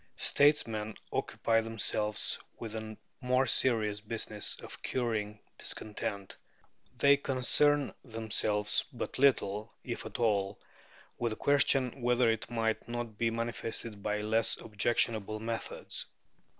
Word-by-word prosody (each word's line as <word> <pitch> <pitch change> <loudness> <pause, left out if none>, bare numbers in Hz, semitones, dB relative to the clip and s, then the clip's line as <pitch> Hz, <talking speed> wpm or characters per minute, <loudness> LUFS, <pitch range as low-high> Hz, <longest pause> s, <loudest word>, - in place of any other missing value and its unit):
Statesmen 115 -8 +2 0.2
occupy 115 0 +1
themselves 110 -1 -1 0.2
with 115 -2 -6
the 110 0 -6 0.2
more 125 +1 +3
serious 110 -6 +2
business 105 -1 -2
of - - -10
curing 110 -4 -1 0.2
discontent. 100 -2 -4 0.6
They 140 0 +6
concern 145 +2 +2
themselves 110 -3 0
but - - -5
little, 110 -6 +2
if 120 - -4
at - - -6
all, 100 -4 +1 0.6
with 120 -2 0
the - - -5
question 135 -1 +2
whether 120 -1 +4
it 110 0 -3
might 115 -2 -1
not 120 -3 -5
be 115 - +3
manifested 115 -2 -2
by 105 +1 -1
less 110 +1 +1
objectionable 110 -1 +1
methods. 115 +1 -4
115 Hz, 115 wpm, -32 LUFS, 105-120 Hz, 0.6 s, They